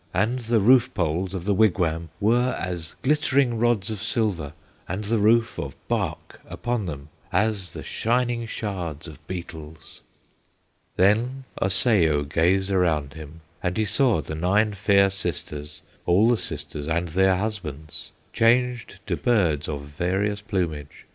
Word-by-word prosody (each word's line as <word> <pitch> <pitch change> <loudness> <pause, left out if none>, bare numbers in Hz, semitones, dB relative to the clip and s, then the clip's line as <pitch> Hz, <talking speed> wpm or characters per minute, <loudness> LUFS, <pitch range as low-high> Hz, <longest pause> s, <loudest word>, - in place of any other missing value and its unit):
And 110 +7 +1
the 115 -1 +1
roof 120 +4 +5
poles 90 +2 -1
of 90 -2 -5
the 100 - +2
wigwam 85 -5 +1
Were 120 +4 +2
as 85 -3 -3
glittering 135 -4 +2
rods 115 -4 +2
of 105 -3 -5
silver, 105 -10 0 0.3
And 95 +4 -3
the 110 +2 0
roof 115 +2 +3
of - - -5
bark - - -3
upon 120 -5 -2
them 70 -2 -7 0.2
As 105 -5 0
the - - -7
shining 120 0 0
shards 90 -9 -4
of 75 -4 -11
beetles. 80 -3 -8 0.9
"Then 115 +8 +2 0.2
Osseo 90 - +3
gazed 90 +6 +1
around 80 -7 +1
him, 80 +1 -11 0.2
And 90 0 -2
he 110 - +1
saw 115 - +3
the 80 - -7
nine 100 +7 +1
fair 100 0 +3
sisters, 75 -6 -2 0.2
All 100 +6 +4
the - - +4
sisters 75 -4 -3
and 85 +2 -1
their 95 +3 +3
husbands, 85 -8 -5 0.2
Changed 120 0 +2
to - - -1
birds 85 -12 +1
of 75 -2 -3
various 95 +8 -2
plumage. 85 -9 -4
95 Hz, 140 wpm, -24 LUFS, 80-110 Hz, 0.9 s, roof